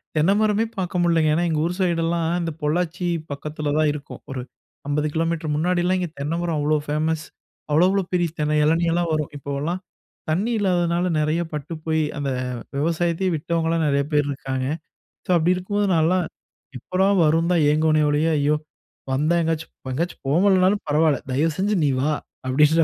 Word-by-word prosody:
தென்னை 160 +6 +4
மரமே 215 +1 +2
பார்க்க 180 -1 -2
முடியலங்க. 165 -3 +3
ஏன்னா, 175 +1 +1
எங்க 155 -1 0
ஊர் 175 - -1
சைடெல்லாம் 170 -2 +1
இந்த 165 -1 -2
பொள்ளாச்சி 175 +3 -1 0.2
பக்கத்தில 150 +1 -4
தான் 155 -1 +3
இருக்கும். 150 -1 -9
ஒரு 130 -2 -4 0.5
50 150 +1 0
கிலோமீட்டர் 165 -1 -1
முன்னாடிலாம் 180 +3 +1
இங்கே 175 -3 -2
தென்னைமரம் 165 +2 -1
அவ்வளோ 150 +1 +2
ஃபேமஸ். 155 +1 -1 0.5
அவ்வளோ 160 +4 +5
அவ்வளோ 195 -1 +1
பெரிய 175 -2 +2
தென்னை 150 0 +1
எளநீ 165 +2 +2
எல்லாம் 170 0 0
வரும். 150 -1 -1
இப்போலாம் 145 +6 -3 0.5
தண்ணி 200 +9 +1
இல்லாததுனால 175 -2 +1
நிறைய 155 +3 +1
பட்டு 150 +2 -5
போய் 160 0 +1 0.2
அந்த 140 -1 -2 0.5
விவசாயத்தையே 170 +4 0
விட்டவங்களலாம் 165 +1 0
நெறைய 140 0 +2
பேர் 150 -1 +2
இருக்காங்க. 130 -1 -3 0.6
ஸோ - - -5
அப்படி 175 +3 +3
இருக்கும்போது, 205 +3 -1
நான்லாம் 170 +3 +2 0.5
எப்படா 185 +9 0 0.2
வரும் 165 +3 +2
தான் 165 -3 +3
ஏங்குவனே 155 0 +3
ஓழியே, 150 +3 +2
"ஐயோ! 145 +1 +2 0.6
வந்தா 150 +6 +2
எங்காச்சும் 160 0 -2 0.2
எங்கயாச்சும் 170 +7 -3
போகலனாலும் 190 +4 +3
பரவாயில்ல 150 0 +3
தயவுசெஞ்சு 165 +9 +1
நீ 140 - +3
வா" 150 +3 +1 0.3
அப்படின்ற 150 +5 +4
165 Hz, 155 wpm, -23 LUFS, 150-175 Hz, 0.6 s, அவ்வளோ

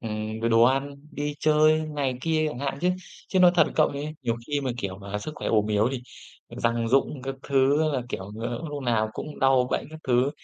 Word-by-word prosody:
ừm, 110 0 -4
rồi 115 +1 0
đồ 115 0 +5
ăn, 135 +3 +2 0.2
đi 145 0 -3
chơi 155 0 +4
này 140 -4 -1
kia 155 +1 +1
chẳng 135 - -6
hạn. 140 0 -3
Chứ 180 - +2 0.4
chứ 190 - +1
nói 180 -1 +8
thật 175 - +5
cậu 155 - +4
ấy, 145 +2 -5
nhiều 115 -2 0
khi 145 -1 -1
mà, 130 - -2
kiểu, 95 -3 -4
mà 100 +1 -5
sức 155 +9 -6
khỏe - - -4
ốm 105 -2 +2
yếu 105 +1 +2
thì 125 - -4 0.5
răng 115 0 0
rụng 135 +2 +1
các 135 0 -4
thứ 140 +2 +3
á 160 - +2
là, 130 -3 -1
kiểu, 95 -3 -6
ờ, 120 0 -2
hôm 145 -4 -6
nào 110 -2 +1
cũng 150 +5 -7
đau 135 -2 +4
bệnh - - -1
các 160 - -9
thứ, 125 +2 +3
135 Hz, 235 wpm, -26 LUFS, 115-150 Hz, 0.5 s, nói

